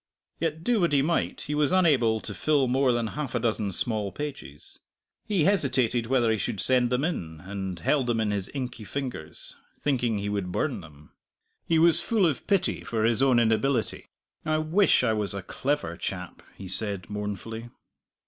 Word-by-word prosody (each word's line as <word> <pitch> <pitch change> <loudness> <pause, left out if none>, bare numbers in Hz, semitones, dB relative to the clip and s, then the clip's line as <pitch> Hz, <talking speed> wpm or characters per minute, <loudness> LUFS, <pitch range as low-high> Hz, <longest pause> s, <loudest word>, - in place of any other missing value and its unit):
Yet, 160 0 -2
do 240 -2 +2
what 170 -4 +2
he 140 -1 +4
might, 170 +3 -1
he 150 - -4
was 150 +1 +2
unable 135 -12 +3
to 105 - -6
fill 140 - +2
more 130 +1 +3
than 120 -1 0
half 135 +2 -4
a - - +2
dozen 110 -3 -1
small 105 +1 0
pages. 75 - -8 0.5
He 195 -7 +2
hesitated 130 - +2
whether 120 -3 +2
he 110 - 0
should 110 -2 -3
send 125 +1 +4
them 125 +2 0
in, 80 - -3
and 95 -2 -5
held 130 - +1
them 120 -2 +1
in 110 -2 0
his 100 -2 -2
inky 125 -4 -4
fingers, 105 - -6 0.2
thinking 125 -6 0
he 100 0 -3
would 100 -3 -2
burn - - -1
them. 75 0 -16 0.6
He 165 - +3
was 165 0 +5
full 220 -5 +2
of 155 -6 -1
pity 200 -3 +1
for 110 -2 -2
his 115 +2 +2
own 135 -3 +4
inability. 115 +2 +1 0.4
"I 155 0 +1
wish 160 +2 +3
I 115 -3 +2
was 105 -2 -1
a 100 - -5
clever 140 - -2
chap," 90 -2 -5 0.2
he 95 - -8
said 100 -1 -2
mournfully. 105 +3 -5
120 Hz, 185 wpm, -27 LUFS, 105-145 Hz, 0.6 s, was